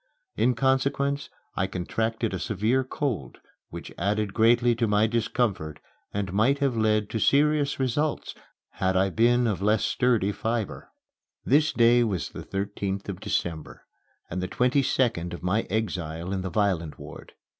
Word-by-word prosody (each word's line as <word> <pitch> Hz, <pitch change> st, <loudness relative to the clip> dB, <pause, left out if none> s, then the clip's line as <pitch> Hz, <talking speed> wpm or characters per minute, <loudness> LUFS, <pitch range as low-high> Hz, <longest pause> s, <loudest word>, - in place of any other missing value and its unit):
In 125 Hz, 0 st, +2 dB
consequence 135 Hz, +2 st, 0 dB, 0.3 s
I 95 Hz, -, 0 dB
contracted 110 Hz, +4 st, -2 dB
a 95 Hz, -, -2 dB
severe 110 Hz, +8 st, 0 dB
cold 125 Hz, -, -3 dB, 0.3 s
which -, -, -9 dB
added 100 Hz, +2 st, 0 dB
greatly 120 Hz, +1 st, +4 dB
to 115 Hz, -1 st, +1 dB
my 105 Hz, +1 st, +3 dB
discomfort 110 Hz, -, -1 dB, 0.3 s
and 100 Hz, -2 st, -3 dB
might 115 Hz, +8 st, +3 dB
have 140 Hz, -3 st, 0 dB
led 110 Hz, -1 st, +2 dB
to 110 Hz, -, -1 dB
serious 145 Hz, +2 st, +2 dB
results 140 Hz, +4 st, -1 dB, 0.4 s
had 95 Hz, 0 st, 0 dB
I 95 Hz, +1 st, +2 dB
been 120 Hz, +4 st, +3 dB
of 105 Hz, -5 st, -1 dB
less 105 Hz, +1 st, +2 dB
sturdy 115 Hz, -5 st, +1 dB
fibre. 110 Hz, 0 st, -3 dB, 0.6 s
This 150 Hz, +4 st, +3 dB
day 120 Hz, +1 st, +4 dB
was 95 Hz, -8 st, -2 dB
the -, -, -8 dB
thirteenth 100 Hz, 0 st, -4 dB
of 95 Hz, -2 st, -5 dB
December 80 Hz, -4 st, -3 dB, 0.4 s
and 90 Hz, +2 st, -4 dB
the 90 Hz, -, -2 dB
twenty 125 Hz, +7 st, +2 dB
second 115 Hz, -10 st, 0 dB
of 85 Hz, -, -12 dB
my 100 Hz, +5 st, 0 dB
exile 90 Hz, -4 st, -3 dB
in 95 Hz, -, -2 dB
the 95 Hz, -, -4 dB
violent 85 Hz, -7 st, 0 dB
ward. -, -, -11 dB
110 Hz, 155 wpm, -26 LUFS, 95-125 Hz, 0.6 s, greatly